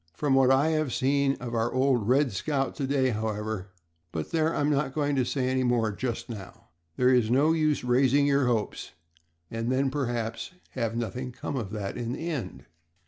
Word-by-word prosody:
From 145 -3 +1
what 135 -1 +5
I 135 +4 +4
have 155 -4 0
seen 140 +1 +2
of 120 -1 -7
our 115 0 0
old 130 -4 +2
'Red 135 +2 +3
Scout' 135 +7 -1
to 135 - -1
day, 135 -1 +2
however, 110 -2 -3 0.4
but 80 -2 -4
there, 160 0 +1
I'm 145 +1 +1
not 140 -2 0
going 145 -2 +1
to 130 - +2
say 130 +1 -1
any 130 0 +1
more 120 -3 +2
just 120 +3 -4
now. 100 -10 -10 0.3
There 125 +5 +4
is 120 -3 +3
no 140 +6 +4
use 155 -2 +1
raising 130 +3 +3
your 140 -2 +3
hopes, 115 -4 -2 0.6
and 115 +2 -2
then 135 +1 +1
perhaps 120 -2 -3 0.2
have 115 -3 -2
nothing 125 +2 -3
come 140 - -5
of 115 -7 -3
that 100 0 -4
in 120 0 -3
the 160 +5 -5
end." 140 -7 -5
130 Hz, 195 wpm, -27 LUFS, 115-140 Hz, 0.6 s, what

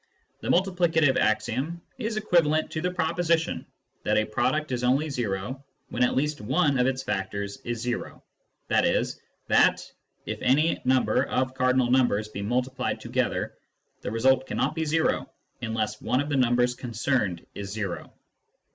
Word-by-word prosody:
The - - -7
multiplicative 175 -6 +3
axiom 130 +9 0 0.2
is 220 -2 -2
equivalent 165 -7 +2
to 155 - -3
the 180 - 0
proposition 170 -1 0 0.3
that - - +1
a 110 - +3
product 130 +8 0
is 125 -1 -2
only 140 +5 +2
zero 120 +2 -3 0.3
when 125 - 0
at 125 - +2
least 150 0 0
one 140 +4 +2
of 125 - +3
its 130 0 -1
factors 100 -2 -3
is 120 -1 -2
zero; 125 0 -4 0.5
i.e. - - +3 0.4
that, - - +3 0.3
if - - -5
any 150 +6 +3
number 130 0 +3
of 130 0 -1
cardinal 130 -1 +2
numbers 120 -5 +3
be 100 - -6
multiplied 125 +4 -1
together, - - -1 0.5
the - - -3
result 130 +4 +2
cannot 140 - 0
be 160 0 -2
o - - 0 0.3
unless 110 -2 -2
one 125 +3 +1
of 145 +1 -1
the 145 - 0
numbers 125 -1 +3
concerned 120 -7 -1
is 100 +1 -6
o. 100 -5 -4
130 Hz, 150 wpm, -26 LUFS, 115-155 Hz, 0.5 s, multiplicative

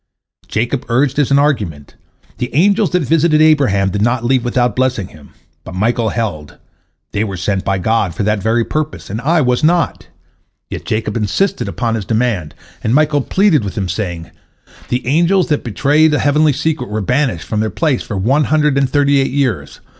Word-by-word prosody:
" - - -70
Jacob 120 +4 -2
urged 130 +4 +1
as 145 - +2
an 140 - +4
argument, 105 - -1 0.5
"The 125 - -2
angels 200 +4 +3
that 180 0 0
visited 155 +1 +2
Abraham 135 -12 +3
did 105 - -2
not 120 +2 0
leave 130 0 +2
without 120 -2 0
blessing 130 -7 -1
him," 75 -3 -16 0.3
but 95 - -9
Michael 110 +3 0
held, 95 -12 -4 0.5
"They 105 - -1
were 100 -4 -4
sent 95 +2 -1
by 95 0 0
God 100 -2 0
for 100 - -2
that 105 0 0
very 115 +3 +1
purpose, 155 -8 -4
and 110 +3 -4
I 160 +5 +2
was 125 -1 +1
not." 170 +1 +1 0.6
Yet - - -6
Jacob 110 -1 -2
insisted 190 - -1
upon 115 -2 -2
his 110 -4 -3
demand, 110 -9 -1 0.3
and 110 +3 +1
Michael 150 -1 +2
pleaded 180 - +2
with 100 0 -6
him, 95 -2 -1
saying, 85 -3 -4 0.6
"The 125 +1 -2
angels 170 +7 +2
that 150 - 0
betrayed 150 +7 +2
a - - +2
heavenly 150 +1 +2
secret 150 -2 -2
were 105 +1 -2
banished 125 - 0
from 105 - -2
their 110 0 0
place 145 - 0
for 105 - -5
one 135 +10 +2
hundred 150 -2 +2
and 135 -2 +1
thirty 140 0 +2
eight 135 - +1
years. 135 -3 -2
125 Hz, 190 wpm, -16 LUFS, 105-150 Hz, 0.6 s, an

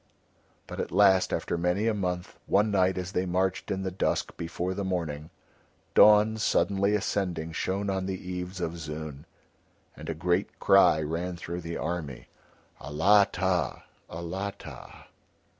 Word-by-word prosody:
But - - -8
at - - -3
last 95 0 +4
after 85 - -2
many 90 +5 +1
a 115 - +2
month, 90 -3 -3
one 105 +2 +3
night 95 -2 +2
as 90 0 -4
they 95 -1 -1
marched 95 +1 -1
in 95 0 -2
the 95 - -2
dusk 90 - -1
before 85 +2 -3
the 100 - -3
morning, 80 -5 -3 0.6
dawn 105 +1 +6
suddenly 100 -1 +2
ascending 90 -5 -2
shone 95 +5 -2
on 95 -1 -1
the 95 -1 -2
eaves 90 0 -6
of 85 -1 -3
Zoon, 75 -2 -7 0.7
and - - -9
a 80 - -2
great 90 +4 -1
cry 95 -5 +5
ran 85 +4 -3
through 85 +1 -6
the 85 0 -5
army: 80 -6 -4 0.5
"Alatta, 95 +3 +2 0.3
Alatta!" 95 +4 -7
90 Hz, 140 wpm, -28 LUFS, 85-95 Hz, 0.7 s, dawn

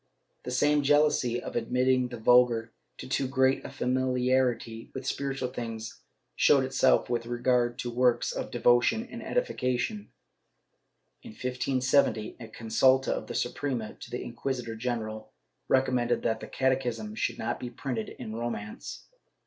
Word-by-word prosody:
The - - -4
same 145 +4 +3
jealousy 145 -4 +3
of - - -7
admitting 125 +2 +2
the 120 -1 -7
vulgar 120 0 +4 0.2
to - - -8
too 135 - 0
great 130 0 +2
a - - -6
famili 125 0 0
arity 120 -3 0
with 130 -1 -5
spiritual 135 -1 -2
things 115 -3 -6 0.3
showed 140 -2 +5
itself 130 0 +3
with 120 -1 -2
regard 120 0 +1
to 120 -3 -4
works 125 0 +2
of - - -4
devotion 120 - +3
and - - -7
edification. 205 - -1 1.1
In 235 -3 -11
1570 130 - +1
a 115 - -8
consulta 130 +4 +2
of - - -2
the - - -6
Suprema 125 -7 -2
to - - -10
the 125 - -4
inquisitor 120 -1 -4
general 110 -2 -4 0.3
recommended 125 -2 +2
that 110 -1 0
the - - -8
catechism 125 -5 -1
should - - -2
not 115 +1 -3
be 125 - -5
printed 120 -2 -4
in 110 -3 -7
Romance. 115 -3 -5
125 Hz, 145 wpm, -28 LUFS, 115-130 Hz, 1.1 s, showed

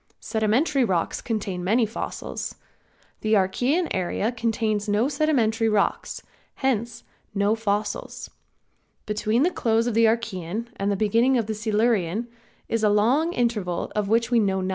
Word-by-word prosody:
Sedimentary 245 +6 +1
rocks 185 -7 0
contain 200 -6 -3
many 225 +6 +3
fossils. 220 - -5 0.6
The 215 0 +2
Archaean 245 - +1
area 190 +4 -1
contains 220 -3 -1
no 210 +5 +2
sedimentary 250 -7 +1
rocks, 210 -2 0 0.3
hence 235 -3 -1 0.3
no 200 +1 +2
fossils. 210 -1 -2 0.8
Between 215 +4 +1
the 355 - +2
close 225 -5 +1
of 240 - -1
the 230 +1 +4
Archaean 220 -1 -2
and 200 0 0
beginning 230 +6 +3
of 230 - 0
the 220 - -3
Silurian 215 -1 0 0.4
is 230 -1 -1
a 210 - +5
long 245 +11 +3
interval 210 - -1
of 210 -2 0
which 230 +2 +2
we 240 - +5
know 195 -3 +1
nothing. 185 - -2
220 Hz, 140 wpm, -24 LUFS, 205-235 Hz, 0.8 s, a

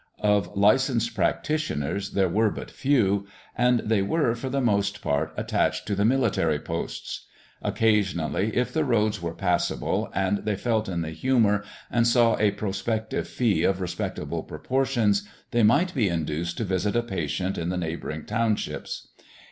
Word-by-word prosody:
Of 105 -1 +1
licensed 115 +3 +3
practitioners 100 - -1
there 95 -1 +3
were 105 +5 +2
but - - -7
few; 105 -9 +1 0.3
and 125 -1 +3
they 110 -2 +1
were, 120 +4 +1
for 120 +3 -5
the 140 +2 0
most 100 -4 +1
part, 75 +2 0
attached - - 0
to 105 - -2
the 100 +1 +1
military 115 - +2
posts. 80 +3 -5 0.3
Occasionally, 100 -4 +1
if 125 - 0
the 160 - +2
roads 110 -5 +1
were 85 -1 -4
passable, 90 -2 0
and 95 +2 +1
they 105 -1 -1
felt 110 +1 0
in 85 -2 -2
the 80 - -5
humour 105 +2 +2 0.3
and 115 -1 +3
saw 115 -2 +4
a 105 - +4
prospective 105 +2 -2
fee 115 -5 +1
of 95 -1 +2
respectable 90 -2 -3
proportions, 115 -6 0 0.2
they 120 - +2
might 145 - +4
be 115 -8 +2
induced 85 +1 -2
to - - -1
visit 95 +1 -1
a 120 - +2
patient 95 -2 -2
in 85 +1 -2
the 90 - -1
neighbouring 80 -2 -4
townships. 110 0 -2
105 Hz, 155 wpm, -26 LUFS, 95-120 Hz, 0.3 s, saw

